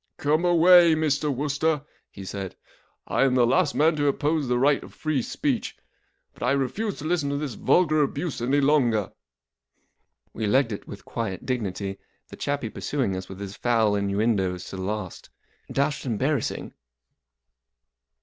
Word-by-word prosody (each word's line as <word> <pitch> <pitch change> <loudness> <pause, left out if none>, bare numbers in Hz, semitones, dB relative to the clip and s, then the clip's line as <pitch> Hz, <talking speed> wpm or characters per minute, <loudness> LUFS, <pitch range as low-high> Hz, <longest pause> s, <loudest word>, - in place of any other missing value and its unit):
44 145 - -1
Come 165 +3 +2
away,' 175 -1 +6
Mr. 150 -1 0
Wooster," 145 +2 0 0.3
he 95 - -10
said. 95 -1 -6 0.5
44 - - -3
I - - +6
am 130 -2 +3
the 125 -2 +5
last 145 +5 +2
man 155 +2 +3
to 145 0 +1
oppose 145 +1 0
the 125 0 +1
right 140 +3 +3
of - - -13
free 155 -4 -1
speech, - - -2 0.6
but - - -21
I 125 +4 +2
refuse 185 - -1
to 150 - -8
listen 160 -4 0
to 140 - -1
this 145 -4 -3
vulgar 155 - +3
abuse 145 0 -2
any 135 +4 +2
longer." 125 -8 +2 1.2
We 110 -1 -2
legged 130 +2 +3
it 105 - -6
with 100 - -10
quiet 110 -6 -4
dignity, 100 -5 -3 0.3
the - - -9
chappie 140 -6 -3
pursuing 130 -10 -2
us 95 0 -6
with 95 - -9
his 100 0 -6
foul 115 -4 +2
innuendoes 100 -2 0
to 95 - -6
the - - -5
last. 100 -1 -5 0.4
Dashed 140 0 -1
embarrassing. 130 +3 -1
135 Hz, 165 wpm, -25 LUFS, 105-150 Hz, 1.2 s, away